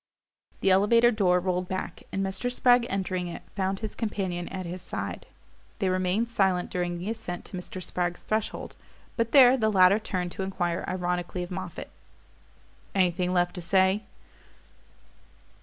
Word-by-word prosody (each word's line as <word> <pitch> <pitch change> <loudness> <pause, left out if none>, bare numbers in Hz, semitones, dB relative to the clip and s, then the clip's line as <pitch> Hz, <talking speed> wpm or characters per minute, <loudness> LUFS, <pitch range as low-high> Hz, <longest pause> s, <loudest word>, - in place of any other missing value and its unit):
The 195 - +4
elevator 230 +5 +5
door 185 -5 +3
rolled 180 0 -1
back, 190 +1 -4
and 195 0 -1
Mr. 195 +6 -2
Spragg, 245 -1 +4
entering 185 -2 -2
it, 170 - -7
found 190 0 -1
his 220 - -4
companion 190 -6 -3
at 185 -1 -5
his 175 +2 -6
side. 100 - -5 0.5
They 190 - 0
remained 185 +5 0
silent 190 -5 +1
during 175 -1 -2
the 185 +5 -3
ascent 175 -6 -6
to - - -8
Mr. 180 +1 -6
Spragg's 175 0 -2
threshold; 215 0 -3 0.4
but 230 -1 0
there 260 -1 +8
the 220 -3 +2
latter 190 +1 +6
turned 180 -5 -3
to - - -6
enquire 175 -3 -1
ironically 180 0 -2
of 175 - -8
Moffatt: 185 -2 -6 1.0
"Anything 180 -1 +2
left 175 -1 +2
to 180 - -5
say?" 190 +3 +3
185 Hz, 155 wpm, -27 LUFS, 180-205 Hz, 1.0 s, there